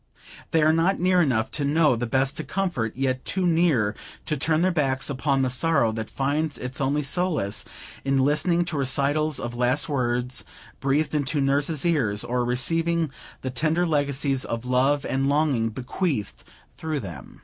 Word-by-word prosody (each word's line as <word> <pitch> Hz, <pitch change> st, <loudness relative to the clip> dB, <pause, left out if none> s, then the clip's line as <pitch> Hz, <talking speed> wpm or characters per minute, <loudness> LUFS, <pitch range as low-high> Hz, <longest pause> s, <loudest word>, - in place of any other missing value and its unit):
They 160 Hz, -1 st, +2 dB
are 155 Hz, +1 st, +4 dB
not 170 Hz, +4 st, +2 dB
near 180 Hz, 0 st, +3 dB
enough 125 Hz, -8 st, +1 dB
to 150 Hz, -, -2 dB
know 150 Hz, +1 st, +3 dB
how -, -, +2 dB
best 130 Hz, +3 st, +1 dB
to 155 Hz, -, -2 dB
comfort, 175 Hz, -, -2 dB
yet 130 Hz, 0 st, -1 dB
too 185 Hz, 0 st, -1 dB
near 160 Hz, -12 st, +2 dB, 0.3 s
to 155 Hz, -, -1 dB
turn 155 Hz, +3 st, +1 dB
their 185 Hz, +1 st, +3 dB
backs 135 Hz, -4 st, 0 dB
upon 135 Hz, 0 st, 0 dB
the 130 Hz, -, +1 dB
sorrow 130 Hz, -4 st, +2 dB
that 110 Hz, 0 st, -5 dB
finds 145 Hz, +3 st, -1 dB
its 125 Hz, +2 st, -5 dB
only 145 Hz, +2 st, +1 dB
solace 155 Hz, -, 0 dB, 0.4 s
in 135 Hz, 0 st, +1 dB
listening 155 Hz, +6 st, +2 dB
to 170 Hz, -3 st, -3 dB
recitals 140 Hz, +3 st, +1 dB
of 120 Hz, 0 st, -5 dB
last 125 Hz, +4 st, +2 dB
words, 125 Hz, -4 st, -1 dB, 0.4 s
breathed 145 Hz, +4 st, 0 dB
into 145 Hz, 0 st, 0 dB
nurse's 140 Hz, +3 st, +1 dB
ears, 120 Hz, -12 st, +1 dB
or 120 Hz, +1 st, -1 dB
receiving 165 Hz, +6 st, +1 dB, 0.3 s
the 130 Hz, -, -4 dB
tender 160 Hz, +7 st, +1 dB
legacies 140 Hz, -3 st, +1 dB
of 115 Hz, +1 st, -4 dB
love 135 Hz, +3 st, +2 dB
and 135 Hz, +1 st, 0 dB
longing 140 Hz, -6 st, +1 dB
bequeathed 130 Hz, -, -3 dB, 0.3 s
through 155 Hz, -3 st, -3 dB
them. 85 Hz, -, -10 dB
140 Hz, 170 wpm, -24 LUFS, 125-160 Hz, 0.4 s, are